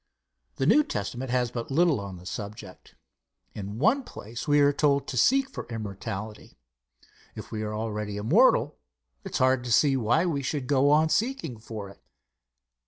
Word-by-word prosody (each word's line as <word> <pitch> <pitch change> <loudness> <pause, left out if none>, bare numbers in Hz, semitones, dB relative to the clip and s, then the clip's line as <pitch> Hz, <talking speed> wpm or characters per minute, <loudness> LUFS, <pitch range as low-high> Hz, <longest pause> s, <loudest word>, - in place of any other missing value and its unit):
The - - -1
New 300 - +5
Testament 120 - -4
has 125 -1 0
but 120 -1 -5
little 155 -2 +3
on 100 -2 -7
the 90 - -14
subject. 100 -1 -8 0.6
In 100 +1 -6
one 225 - +3
place 115 - -8
we 145 0 +4
are 145 0 +4
told 140 -2 +2
to - - -5
seek 270 - +3
for 270 - -8
immortality. 105 -1 -7 0.8
If - - -9
we 110 - -4
are 105 0 -3
already 105 -2 -4
immortal, 105 +2 +3 0.4
it - - -8
is - - +1
hard 130 -1 +2
to 120 - -5
see 135 +4 +4
why 130 +7 +2
we 155 -6 -1
should 135 +1 -3
go 140 +1 +3
on 155 +2 +4
seeking 190 - -1
for 110 -2 -7
it. 100 - -15
125 Hz, 170 wpm, -27 LUFS, 105-145 Hz, 0.8 s, New